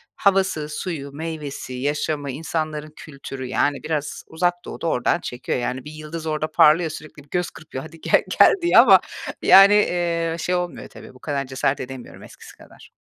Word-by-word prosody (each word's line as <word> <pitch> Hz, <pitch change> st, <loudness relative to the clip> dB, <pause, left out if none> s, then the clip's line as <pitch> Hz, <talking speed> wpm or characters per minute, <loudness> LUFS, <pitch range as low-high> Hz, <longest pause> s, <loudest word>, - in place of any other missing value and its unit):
havası, 190 Hz, -6 st, +1 dB
suyu, 150 Hz, -3 st, -5 dB
meyvesi, 150 Hz, -4 st, -6 dB
yaşamı, 145 Hz, +1 st, -2 dB
insanların 155 Hz, 0 st, -4 dB
kültürü, 135 Hz, -3 st, -8 dB
yani, 145 Hz, +2 st, 0 dB
biraz 155 Hz, -2 st, -3 dB
Uzak 175 Hz, +2 st, 0 dB
Doğu -, -, -8 dB
da 170 Hz, -, -2 dB
oradan 125 Hz, -, +1 dB
çekiyor. 125 Hz, +1 st, -4 dB
Yani, 125 Hz, +2 st, -4 dB
bir 150 Hz, -, -8 dB
yıldız 155 Hz, +1 st, -8 dB
orada 155 Hz, 0 st, -2 dB
parlıyor 160 Hz, +2 st, +5 dB
sürekli 155 Hz, -1 st, -10 dB
bir 145 Hz, -, -27 dB
göz 180 Hz, +2 st, -1 dB
kırpıyor, 135 Hz, -4 st, -9 dB
"Hadi, 165 Hz, 0 st, -13 dB
gel -, -, +3 dB, 0.2 s
gel." -, -, +8 dB
diye 345 Hz, -, +3 dB
ama, 200 Hz, -6 st, +8 dB, 0.4 s
yani, 195 Hz, +1 st, +8 dB
eee, 170 Hz, -4 st, +1 dB
şey 180 Hz, +3 st, -1 dB
olmuyor 180 Hz, -1 st, -4 dB
tabii, -, -, -13 dB
bu 130 Hz, -, -17 dB
kadar 140 Hz, -2 st, -3 dB
cesaret 130 Hz, +1 st, -1 dB
edemiyorum 130 Hz, -1 st, -9 dB
eskisi -, -, -14 dB
kadar. -, -, -17 dB
155 Hz, 175 wpm, -22 LUFS, 140-165 Hz, 0.4 s, gel